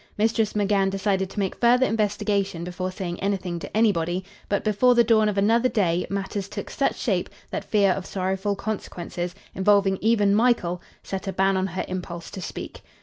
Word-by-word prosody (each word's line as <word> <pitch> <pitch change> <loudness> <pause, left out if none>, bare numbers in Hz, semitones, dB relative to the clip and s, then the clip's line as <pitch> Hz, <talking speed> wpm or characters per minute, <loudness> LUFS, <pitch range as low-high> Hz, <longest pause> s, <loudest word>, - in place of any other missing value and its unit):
Mistress 220 0 +1
McGann 200 -2 +2
decided 195 -1 0
to - - -6
make 195 -2 -1
further 245 +2 +4
investigation 205 -4 0
before 180 +1 -4
saying 180 -2 -5
anything 190 -3 -2
to 195 - -5
anybody; 185 -4 +1 0.2
but, 200 - 0
before 225 +4 +4
the 240 - +6
dawn 220 -2 +4
of 205 - -3
another 230 +5 +3
day, 180 -7 +1
matters 195 0 -3
took - - -6
such - - 0
shape - - 0 0.2
that - - -3
fear 200 -3 +3
of 185 0 -3
sorrowful 190 +2 -1
consequences, 180 -4 -4 0.2
involving 195 0 +3
even 210 -2 +3
Michael, 205 -6 +2 0.2
set 195 0 -5
a - - 0
ban 195 0 +2
on 190 0 +1
her 185 0 -3
impulse 180 -2 -6
to 190 - -7
speak. - - -7
195 Hz, 180 wpm, -24 LUFS, 185-210 Hz, 0.2 s, the